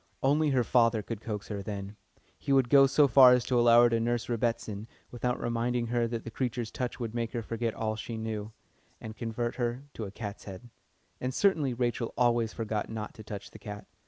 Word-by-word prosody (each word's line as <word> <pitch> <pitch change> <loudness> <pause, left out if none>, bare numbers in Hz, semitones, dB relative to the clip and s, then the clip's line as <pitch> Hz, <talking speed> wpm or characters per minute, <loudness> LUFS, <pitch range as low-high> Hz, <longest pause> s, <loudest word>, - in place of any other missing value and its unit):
Only 150 +3 +3
her 130 -3 +2
father 115 -2 +3
could 115 -1 -6
coax 105 -2 -5
her 100 -2 -4
then. 100 0 -6 0.4
He 140 - -3
would 135 -3 +3
go 135 -1 +8
so 140 +2 +4
far 130 0 +8
as 125 -1 +2
to 125 -2 +2
allow 120 0 +7
her 120 - +5
to 115 - +2
nurse 120 0 0
"Rebbitzin," 115 -2 -2 0.2
without 125 0 -2
reminding 120 +1 -1
her 120 -1 +2
that 115 -1 -4
the 115 - -7
creature's 120 -2 -3
touch 125 0 -4
would 115 -2 -4
make 115 0 -3
her 120 -2 -2
forget 115 0 -3
all 110 -1 -2
she 110 +1 -6
knew, 110 -1 -4 0.5
and 110 0 -8
convert 115 +1 -3
her 120 +1 -2
into 110 - -5
a - - -6
"cat's 105 -1 -7
head." 100 +5 -10 0.5
And 130 - -2
certainly 155 -11 +2
Rachel 120 -1 -2
always 120 -2 +2
forgot 110 -2 -3
not 110 -2 -5
to 110 - -11
touch 105 -1 -8
the - - -12
cat. 105 -2 -8
115 Hz, 215 wpm, -29 LUFS, 110-125 Hz, 0.5 s, go